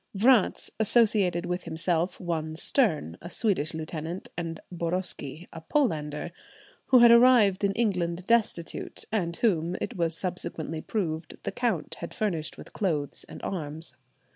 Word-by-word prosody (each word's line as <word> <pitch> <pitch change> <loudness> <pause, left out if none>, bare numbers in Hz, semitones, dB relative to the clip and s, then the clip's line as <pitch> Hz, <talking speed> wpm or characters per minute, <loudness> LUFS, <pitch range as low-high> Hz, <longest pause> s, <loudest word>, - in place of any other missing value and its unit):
Vratz 235 0 +3
associated 205 -6 +3
with 180 0 -3
himself 170 +1 -1
one 160 -3 -3
Stern, 160 - +2
a 170 - -8
Swedish 180 -8 0
lieutenant, 160 +2 -5
and 165 -2 -4
Boroski, 170 -2 -3
"a 165 - -8
Polander," 160 - -1 0.6
who 255 - +6
had 235 -1 +8
arrived 235 -5 +6
in 200 - +3
England 180 -5 0
destitute, 215 -7 0
and 175 -6 0
whom, 175 -6 +1
it 245 - -4
was 165 -2 0
subsequently 170 -3 -4
proved, 165 -6 -3
the - - -2
count 225 -11 -1
had 170 - -7
furnished 170 -8 -2
with - - -12
clothes 155 -8 -2
and - - -11
arms. 160 -3 -3
175 Hz, 140 wpm, -27 LUFS, 160-210 Hz, 0.6 s, had